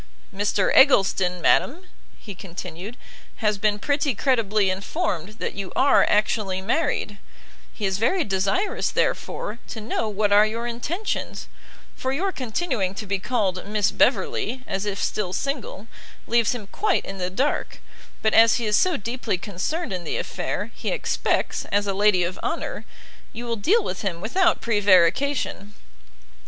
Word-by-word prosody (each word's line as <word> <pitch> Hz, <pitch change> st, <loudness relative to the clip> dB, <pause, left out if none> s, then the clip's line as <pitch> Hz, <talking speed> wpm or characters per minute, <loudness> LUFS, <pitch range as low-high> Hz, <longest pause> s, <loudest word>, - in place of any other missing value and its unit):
"Mr 200 Hz, 0 st, +1 dB
Eggleston, 190 Hz, -8 st, +4 dB
madam," 305 Hz, -, +2 dB, 0.3 s
he 205 Hz, -, -9 dB
continued, 185 Hz, +3 st, -8 dB, 0.4 s
"has 210 Hz, -3 st, 0 dB
been 210 Hz, 0 st, +2 dB
pretty 285 Hz, +2 st, 0 dB
credibly 215 Hz, -6 st, +2 dB
informed 200 Hz, -, -3 dB
that -, -, -3 dB
you 195 Hz, -1 st, -6 dB
are 275 Hz, +2 st, +5 dB
actually 210 Hz, -2 st, +1 dB
married: 210 Hz, -, -1 dB, 0.5 s
he 210 Hz, -, -4 dB
is 190 Hz, 0 st, 0 dB
very 345 Hz, -, +2 dB
desirous, 195 Hz, -, 0 dB
therefore, 215 Hz, +3 st, -2 dB
to 225 Hz, -, -6 dB
know 220 Hz, 0 st, -2 dB
what 205 Hz, 0 st, 0 dB
are 205 Hz, +1 st, +7 dB
your 230 Hz, +2 st, -4 dB
intentions, 290 Hz, -, -3 dB, 0.5 s
for 260 Hz, -, -2 dB
your 370 Hz, +8 st, 0 dB
continuing 245 Hz, -, -2 dB
to 210 Hz, -, -5 dB
be 200 Hz, -1 st, -1 dB
called 195 Hz, -5 st, -1 dB
Miss 210 Hz, -1 st, +1 dB
Beverley, 245 Hz, +2 st, +1 dB
as 195 Hz, +2 st, -3 dB
if 200 Hz, -1 st, -3 dB
still 190 Hz, -4 st, -2 dB
single, 255 Hz, -5 st, -3 dB, 0.4 s
leaves 235 Hz, 0 st, +2 dB
him 220 Hz, -4 st, -7 dB
quite 400 Hz, -, 0 dB
in 195 Hz, 0 st, -7 dB
the 180 Hz, 0 st, -1 dB
dark: 260 Hz, +11 st, -1 dB, 0.4 s
but, 220 Hz, -, +2 dB
as 225 Hz, 0 st, +7 dB
he 235 Hz, -, -1 dB
is 210 Hz, -1 st, +2 dB
so 365 Hz, -, +3 dB
deeply 230 Hz, -2 st, -3 dB
concerned 205 Hz, -, -3 dB
in 180 Hz, -2 st, -4 dB
the 160 Hz, -, -3 dB
affair, -, -, -3 dB
he -, -, -4 dB
expects, -, -, -1 dB
as 205 Hz, +1 st, 0 dB
a 200 Hz, -, -1 dB
lady 200 Hz, -2 st, +3 dB
of 175 Hz, +1 st, -3 dB
honour, -, -, -3 dB, 0.5 s
you 240 Hz, +2 st, -6 dB
will 235 Hz, -1 st, -1 dB
deal 390 Hz, -, +2 dB
with 185 Hz, -, -4 dB
him 185 Hz, -5 st, -3 dB
without 335 Hz, -, +2 dB
prevarication." 205 Hz, +2 st, +2 dB
210 Hz, 155 wpm, -24 LUFS, 195-255 Hz, 0.5 s, are